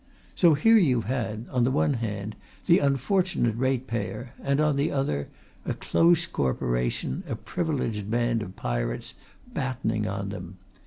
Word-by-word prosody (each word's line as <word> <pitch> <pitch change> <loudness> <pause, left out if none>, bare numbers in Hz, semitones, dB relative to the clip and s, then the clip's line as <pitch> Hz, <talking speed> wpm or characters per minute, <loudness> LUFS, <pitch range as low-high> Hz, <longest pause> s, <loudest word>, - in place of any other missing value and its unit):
So 170 -4 +5
here 225 +10 +6
you've 130 - +3
had, 115 -2 -2
on 125 -2 +2
the 120 - +3
one 140 +2 +2
hand, 105 -3 -4 0.3
the 170 - +6
unfortunate 140 - +1
ratepayer 120 -2 -2
and, 140 +1 +1
on 150 -1 +3
the 140 +3 +1
other, 75 - -1 0.4
a - - -2
close 170 0 +3
Corporation, 60 - -1
a - - -1
privileged 115 - -2
band 120 0 +1
of 95 -2 -7
pirates, - - -2 0.4
battening 115 -5 -1
on 100 0 -3
them. 95 -2 -7
120 Hz, 145 wpm, -26 LUFS, 100-140 Hz, 0.4 s, here